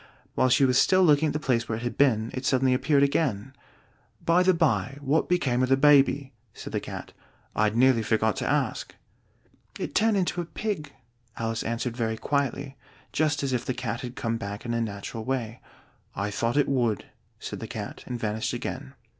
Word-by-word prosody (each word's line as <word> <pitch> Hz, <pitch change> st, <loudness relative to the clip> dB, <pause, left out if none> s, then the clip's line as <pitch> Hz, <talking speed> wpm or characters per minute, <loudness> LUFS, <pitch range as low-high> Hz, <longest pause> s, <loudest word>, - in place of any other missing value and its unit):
While 130 Hz, -, +2 dB
she 130 Hz, +2 st, +5 dB
was 125 Hz, -1 st, +3 dB
still 185 Hz, 0 st, +4 dB
looking 155 Hz, -2 st, +4 dB
at -, -, -1 dB
the 150 Hz, -, -1 dB
place 120 Hz, -5 st, 0 dB
where 110 Hz, -, -1 dB
it 115 Hz, -, -7 dB
had 120 Hz, -, -3 dB
been, 115 Hz, -5 st, +2 dB
it 130 Hz, -, -4 dB
suddenly 130 Hz, -1 st, +2 dB
appeared 140 Hz, +2 st, +3 dB
again. 135 Hz, -4 st, 0 dB, 0.7 s
"By 170 Hz, +2 st, +4 dB
the 185 Hz, +1 st, +5 dB
by, 160 Hz, -5 st, +1 dB
what 145 Hz, +3 st, 0 dB
became 140 Hz, -9 st, +1 dB
of 130 Hz, -, +1 dB
the 135 Hz, -, +4 dB
baby?" 140 Hz, -1 st, +4 dB, 0.2 s
said -, -, -8 dB
the -, -, +1 dB
Cat. -, -, -8 dB, 0.4 s
"I'd 105 Hz, 0 st, +2 dB
nearly 125 Hz, -1 st, +4 dB
forgotten 110 Hz, -1 st, +1 dB
to -, -, +2 dB
ask." -, -, -1 dB, 0.8 s
"It -, -, -4 dB
turned 220 Hz, -1 st, +3 dB
into 180 Hz, -1 st, 0 dB
a -, -, -5 dB
pig," 195 Hz, -3 st, -4 dB, 0.5 s
Alice 115 Hz, 0 st, -2 dB
answered 115 Hz, +1 st, -3 dB
very 110 Hz, -2 st, -1 dB
quietly, 140 Hz, +2 st, -2 dB, 0.4 s
just 150 Hz, -2 st, +1 dB
as 135 Hz, -2 st, -1 dB
if 125 Hz, -1 st, 0 dB
the 130 Hz, -, -3 dB
Cat 120 Hz, -1 st, -3 dB
had 125 Hz, -1 st, -7 dB
come 115 Hz, 0 st, -2 dB
back 105 Hz, -1 st, -6 dB
in 120 Hz, -, -2 dB
a 115 Hz, -, 0 dB
natural 110 Hz, +1 st, -5 dB
way. 120 Hz, -2 st, -3 dB, 0.5 s
"I 100 Hz, +1 st, -2 dB
thought 115 Hz, +5 st, -1 dB
it 145 Hz, -, +3 dB
would," 120 Hz, -7 st, 0 dB, 0.3 s
said -, -, -6 dB
the -, -, -6 dB
Cat, -, -, -7 dB
and 125 Hz, -1 st, -4 dB
vanished 110 Hz, -1 st, -2 dB
again. 65 Hz, -, -5 dB
130 Hz, 195 wpm, -26 LUFS, 115-145 Hz, 0.8 s, she